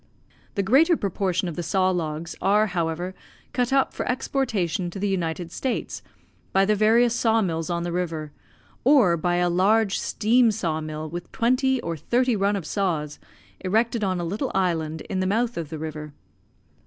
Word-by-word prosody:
The 200 - +1
greater 300 - +4
proportion 190 -2 -1
of 170 - -5
the 175 - -3
saw 185 +2 +1
logs 160 -2 -3
are, 210 +3 +4
however, 175 -1 -2 0.4
cut 245 0 0
up 270 0 +2
for - - -3
exportation 220 - -1
to 175 - -8
the 205 +1 -1
United 170 -3 -2
States 260 +5 -3 0.5
by 195 0 +4
the 215 - +3
various 225 +3 +4
saw 225 -1 +2
mills 165 -3 -2
on 170 -1 -1
the 175 - -3
river, 165 -4 -3 0.5
or 245 -10 +5
by 175 +2 0
a 175 0 +2
large 195 +4 +2
steam 235 +2 +3
saw 170 -7 -1
mill 155 0 -5
with 175 +3 -7
twenty 255 +2 +2
or 170 0 -3
thirty 245 - +1
run 200 0 +1
of 190 -5 -4
saws, 160 -7 -2 0.4
erected 220 +4 0
on 185 -2 0
a - - -2
little 210 +10 -2
island 160 -4 0
in 190 - -4
the 185 - 0
mouth 230 +4 0
of 165 -3 -4
the 160 - -5
river. 150 -1 -6
185 Hz, 180 wpm, -24 LUFS, 170-225 Hz, 0.5 s, or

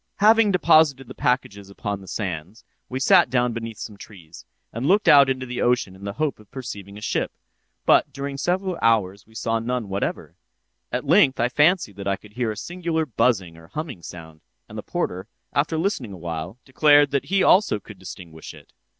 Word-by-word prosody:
"'Having 220 +1 +5
deposited 155 -7 +4
the 130 - -9
packages 125 -8 -1
upon 100 0 -5
the 95 - -13
sands, 95 +1 -5 0.2
we 130 - -3
sat 175 +2 +5
down 125 -1 +1
beneath 115 -1 -6
some 105 -3 -8
trees, 85 -6 -13 0.3
and 120 +5 -2
looked 205 +4 +3
out 140 -2 +7
into 130 -1 -2
the 125 0 -4
ocean 120 -6 +1
in 95 +1 -11
the 100 - -4
hope 145 +3 -2
of 105 - -18
perceiving 100 -6 -8
a - - -10
ship, - - -1 0.5
but - - +4
during 140 0 -5
several 180 +5 -1
hours 100 -4 +1
we 110 - -21
saw 115 +1 -1
none 120 -2 -3
whatever. 95 +1 -3 0.6
At - - -2
length 135 -1 +4
I 120 +1 +2
fancied 150 - +2
that 100 0 -6
I 100 - +1
could 105 +2 -17
hear 120 0 -1
a 105 - -5
singular 170 +4 -2
buzzing 105 - 0
or 80 0 -15
humming 140 - -6
sound; 80 -1 -11 0.3
and - - -12
the - - -4
porter, 95 +3 -3 0.3
after 155 +2 0
listening 155 - -2
awhile, 85 +2 -6
declared 145 +1 +4
that 140 -1 0
he 195 0 +1
also 185 - +4
could 105 -2 -13
distinguish 85 -4 -10
it. - - -18
115 Hz, 195 wpm, -23 LUFS, 100-145 Hz, 0.6 s, out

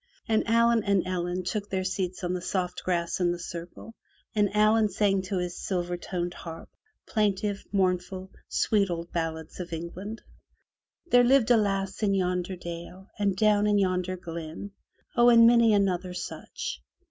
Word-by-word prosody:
And 220 -1 +3
Allen 230 0 +4
and 200 -3 +2
Ellen 180 0 -2
took 200 +3 -3
their 190 -1 -1
seats 185 -1 -3
on 175 0 -1
the 180 - -3
soft 180 -1 -2
grass 170 -1 -1
in 175 -1 +2
the 175 - -2
circle 175 +5 -8 0.4
and 210 -2 +2
Allen 215 +1 +4
sang 195 -1 +1
to 190 +1 -3
his 180 -1 -3
silver 175 -2 -1
toned 175 0 -4
harp, 165 -2 -9 0.4
plaintiff, 205 -1 0
mournful, 185 0 -1 0.2
sweet 200 -3 +2
old 170 0 -4
ballads 160 -1 -4
of 175 -1 -6
England. 185 +7 -6 0.9
There 245 0 +7
lived 245 -1 +4
a 240 - +7
lass 195 -2 -1
in 200 -2 +2
yonder 180 0 -1
dale, 175 +2 -8
and 200 -2 +1
down 210 +1 +3
in 205 -1 +3
yonder 185 -1 0
glen, 165 +3 -7 0.4
0!'' 240 0 +6
and 230 -1 +8
many 235 -1 +6
another 185 -3 +1
such. - - -6
190 Hz, 160 wpm, -27 LUFS, 175-210 Hz, 0.9 s, and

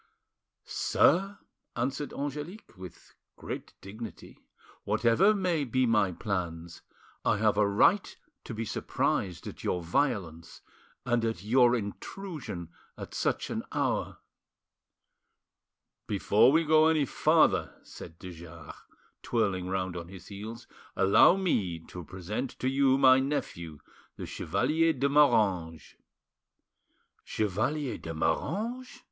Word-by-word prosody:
"Sir," 195 +4 +2 0.4
answered 135 +4 -2
Angelique, 145 - -6
with 90 -2 -12 0.2
great - - -7
dignity, 110 +3 -10 0.4
"whatever 120 - +3
may 180 -6 0
be 130 0 +1
my 105 -5 +2
plans, 85 -4 -4 0.4
I - - +2
have 105 0 +2
a 105 0 +3
right 110 - +2 0.3
to 115 - -6
be 115 +1 -3
surprised 90 -3 -2
at - - -9
your 90 - -1
violence 85 - -2 0.4
and 120 -1 +1
at 110 -6 -2
your 120 +2 +4
intrusion 115 - -6 0.3
at - - -9
such - - -1
an - - -2
hour." - - -1 1.9
"Before 105 +4 +4
we 160 +3 +3
go 155 0 +5
any 155 -3 +3
farther," - - +2
said 80 - -11
de 90 0 -9
Jars, 85 -2 -11 0.5
twirling 100 -6 -1
round 95 -1 -2
on 85 -1 -6
his 95 -1 -12
heels, 110 +4 -8 0.3
"allow 100 - +6
me 105 - 0
to 85 +2 -10
present 95 - -5
to 130 - -2
you 135 0 +3
my 130 -1 +6
nephew, 85 - -3 0.4
the - - -7
Chevalier 160 +6 0
de 140 0 0
Moranges." 105 - +2 1.3
"Chevalier 120 +8 -2
de 80 0 -7
Moranges!" 220 - -2
115 Hz, 115 wpm, -29 LUFS, 90-140 Hz, 1.9 s, allow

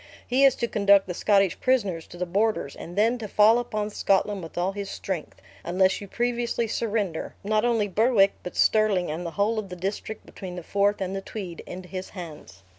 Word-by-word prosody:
He 260 +3 +2
is 270 - +5
to 235 - -1
conduct 200 -2 +4
the 180 - -4
Scottish 195 0 +2
prisoners 205 -11 0
to 175 - -12
the 180 - -2
borders, 195 -5 0
and 175 - -9
then 225 +4 +2
to 220 - -5
fall 215 +3 +5
upon 215 -3 -3
Scotland 200 0 +1
with 165 0 -10
all 180 +2 +1
his 200 0 -5
strength, 180 -5 -5 0.2
unless 190 +3 +2
you 200 - -8
previously 240 +1 -1
surrender, 210 -7 -2
not 215 +2 +1
only 230 -3 +2
Berwick, 205 0 +3
but 180 - -7
Stirling, 205 -6 +3
and 170 +3 -4
the 165 - -9
whole 215 +2 +2
of 200 -3 -6
the 180 - -6
district 200 +4 -5
between 185 -2 -8
the 175 - -6
Forth 200 +3 +1
and 190 0 -2
the 195 - -3
Tweed, 190 -4 -7
into 180 0 -8
his 185 +1 -6
hands." 155 - -9
200 Hz, 205 wpm, -26 LUFS, 180-220 Hz, 0.2 s, is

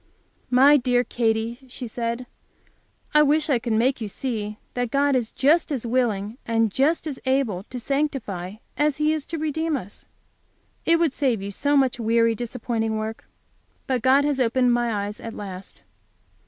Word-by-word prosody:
"My 270 +4 +6
dear 245 -1 +2
Katy," 230 0 -1
she 250 0 -6
said, 235 +1 -3 0.9
"I 300 - +7
wish 300 +1 +3
I 250 - +3
could 230 -1 -2
make 245 +3 +2
you 220 - -2
see 210 -2 -4 0.2
that 245 -1 -1
God 280 +2 +2
is 240 -3 -1
just 310 +4 +2
as 255 -5 -2
willing, 230 -2 0
and 225 -2 +1
just 285 - +1
as 290 -4 -5
able 260 -9 +1
to 250 - -5
sanctify, 245 -10 -2 0.2
as 295 -1 +1
He 305 +1 +2
is 310 -2 -4
to 330 - -4
redeem 315 0 -1
us. 200 -4 -11 0.8
It 335 0 +5
would 330 -5 +1
save 245 -9 0
you 200 - -4
so 285 +8 +1
much 260 -3 +2
weary, 230 0 +3
disappointing 225 -1 -2
work. 220 +1 -5 0.6
But 255 -3 0
God 270 +3 +4
has 290 -2 0
opened 250 0 +3
my 230 -4 0
eyes 205 +1 -7
at 230 - -7
last." 195 -2 -8
245 Hz, 170 wpm, -24 LUFS, 225-280 Hz, 0.9 s, I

